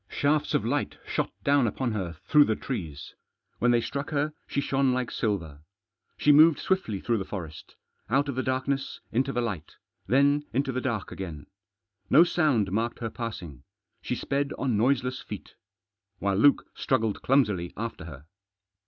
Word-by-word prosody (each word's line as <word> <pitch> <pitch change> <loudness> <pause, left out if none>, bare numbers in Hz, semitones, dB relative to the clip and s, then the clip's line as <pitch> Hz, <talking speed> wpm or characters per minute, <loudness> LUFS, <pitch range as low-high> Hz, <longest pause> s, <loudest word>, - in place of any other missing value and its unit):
Shafts 150 +1 +1
of 110 - +1
light 140 +5 -1
shot - - -1
down 140 -3 +4
upon 125 +2 -1
her 95 -6 -3
through 150 -1 +6
the 110 - 0
trees. 80 - -6 0.5
When 120 - +3
they 120 -1 +4
struck 140 +4 -4
her 150 0 0
she - - -1
shone 135 -2 +1
like 125 -1 -2
silver. 85 -10 -2 0.6
She 150 - +4
moved 155 +1 +7
swiftly 190 - -1
through 115 +2 0
the - - -2
forest; 85 -6 -8 0.3
out 140 +5 +2
of 140 - -2
the 130 - -1
darkness 135 +1 -2
into 130 +3 +1
the 120 - -1
light, 100 -10 -4 0.3
then 140 +3 +3
into 135 +2 0
the 130 0 -2
dark 115 -7 -2
again. 80 -7 -7 0.6
No 165 - +8
sound 145 - +1
marked 115 +4 -1
her 115 -2 -4
passing. 95 - -6 0.4
She 125 - -2
sped 140 +2 -1
on 130 -5 0
noiseless 125 +3 +1
feet. - - -9 0.6
While 100 -1 0
Luke 140 +7 +5
struggled 115 -5 0
clumsily 105 -10 +2
after 115 -6 -5
her. 75 -3 -10
125 Hz, 165 wpm, -27 LUFS, 100-140 Hz, 0.6 s, No